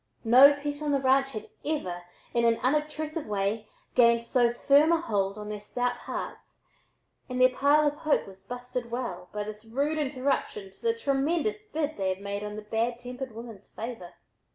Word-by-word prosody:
No 255 +5 +8
pet 290 +1 -5
on 300 - -1
the 280 - +3
ranch 270 +1 +3
had 215 -1 -6 0.2
ever, 185 - -2 0.3
in 235 - +2
an 230 -1 +4
unobtrusive 305 +2 -1
way, 210 +1 -1 0.3
gained 235 -1 +5
so 235 0 +3
firm 285 +6 +4
a 335 - +4
hold 200 - -1
on 210 0 -7
their 210 0 -4
stout 245 +4 -1
hearts - - -7 0.6
and 250 0 -3
"their 255 0 +5
pile 295 +2 +4
of 295 0 -1
hope 310 -1 +1
was 190 0 -13
busted 245 +2 -5
well" 230 -8 -4
by 210 0 -3
this 210 +1 -8
rude 280 +7 -1
interruption 265 -8 -1
to - - -27
the 460 0 +1
tremendous 340 +7 0
bid 310 -4 -2
they 190 -1 0
had 185 0 -2
made 200 +1 -4
on 210 0 -5
the 215 - -7
bad 230 +3 -1
tempered 250 +1 -7
woman's 225 -4 -9
favor. 225 -6 -7
245 Hz, 185 wpm, -28 LUFS, 210-285 Hz, 0.6 s, No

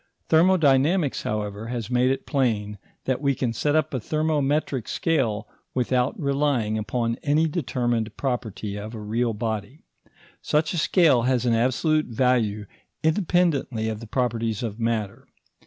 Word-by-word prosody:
Thermodynamics, 160 -2 +3
however, 105 0 -3
has 120 -1 -4
made 125 +1 +3
it 135 0 -1
plain 105 -7 -1 0.3
that 130 0 -1
we 140 -2 +1
can 120 -3 -1
set 145 +6 0
up 155 -1 +1
a 130 - 0
thermometric 150 -2 0
scale 115 -10 0 0.3
without 125 +1 0
relying 140 -6 0
upon 115 +2 -1
any 155 +2 +2
determined 120 -8 -1
property 110 -6 -3
of 110 +3 -7
a - - -6
real 115 +2 -1
body. 110 +5 -4 0.6
Such 155 +2 +1
a 170 - 0
scale 155 -7 +4
has 125 -2 +1
an 120 - +3
absolute 130 +7 +1
value 115 -4 +1 0.4
independently 160 - +1
of 110 -1 -4
the 115 - -9
properties 115 -2 -1
of 110 -1 -4
matter. 115 -3 -2
125 Hz, 140 wpm, -24 LUFS, 110-145 Hz, 0.6 s, scale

